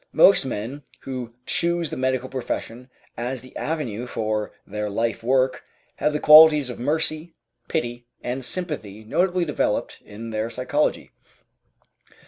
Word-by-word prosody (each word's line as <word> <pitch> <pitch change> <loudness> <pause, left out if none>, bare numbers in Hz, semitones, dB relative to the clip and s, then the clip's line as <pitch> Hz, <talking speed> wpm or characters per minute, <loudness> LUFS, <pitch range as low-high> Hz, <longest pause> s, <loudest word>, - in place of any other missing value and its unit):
Most 195 - +6
men 130 +4 -4 0.2
who 125 -3 -6
choose 170 -2 0
the - - -3
medical 130 0 0
profession 125 -1 -5 0.3
as 125 +2 -4
the 130 - -15
avenue 125 -8 -3
for 110 -2 -2
their 105 +1 -3
life 115 +2 -1
work 130 +1 +2 0.3
have 150 - +1
the 150 - -1
qualities 150 -3 +8
of 120 - -9
mercy, 155 +4 -1 0.3
pity, 120 -6 -3 0.2
and 125 +2 -3
sympathy 125 - -4
notably 180 - +1
developed 150 - -1
in 115 +2 -8
their 110 +1 -2
psychology. 130 +5 -1
130 Hz, 130 wpm, -24 LUFS, 115-150 Hz, 0.3 s, qualities